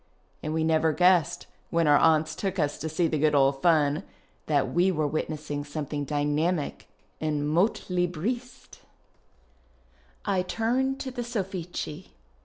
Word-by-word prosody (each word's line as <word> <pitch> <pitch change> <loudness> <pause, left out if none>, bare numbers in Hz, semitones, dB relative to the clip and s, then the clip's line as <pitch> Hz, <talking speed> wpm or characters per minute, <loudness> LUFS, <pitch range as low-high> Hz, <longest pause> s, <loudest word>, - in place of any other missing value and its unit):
And 155 - -3
we 160 0 0
never 160 0 +2
guessed, 175 0 +3 0.2
when 165 0 +2
our 145 -1 +6
aunts 155 -1 +3
took 190 +3 -3
us 145 0 0
to 160 - -3
see 165 +2 +1
the 155 -1 -1
good 150 0 +3
old 135 0 +3
fun, 155 -2 +3 0.5
that 145 -3 +1
we 180 +3 +3
were 155 -4 0
witnessing 150 -1 -3
something 145 0 -4
dynamic 150 +3 -1 0.3
and 150 -2 -1
motlibriste! 180 +6 -1 1.5
I 190 -2 +1
turn 245 +8 0
to 265 -1 -5
the 245 -1 -4
Sofhci. 190 -7 -4
160 Hz, 135 wpm, -27 LUFS, 150-185 Hz, 1.5 s, our